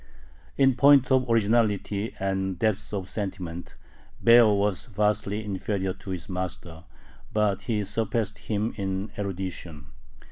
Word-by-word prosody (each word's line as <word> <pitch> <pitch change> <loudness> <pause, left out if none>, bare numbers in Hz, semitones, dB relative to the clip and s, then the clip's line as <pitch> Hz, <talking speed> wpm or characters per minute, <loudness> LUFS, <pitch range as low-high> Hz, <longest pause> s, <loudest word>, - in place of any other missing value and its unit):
In 135 -1 +5
point 140 0 +5
of 130 -1 +3
originality 110 -2 +1
and 95 -1 -1
depth 110 +1 -1
of 95 -3 -3
sentiment 95 -4 -5 0.5
Baer 120 0 +8
was 100 -2 0
vastly 105 0 -1
inferior 95 -1 -2
to 95 - -12
his 90 -2 -5
master, 90 -3 -6 0.5
but 105 -2 +1
he 105 -2 +1
surpassed 110 0 -2
him 110 +1 -2
in 95 +1 -3
erudition. 90 -7 -5
100 Hz, 120 wpm, -26 LUFS, 95-110 Hz, 0.5 s, Baer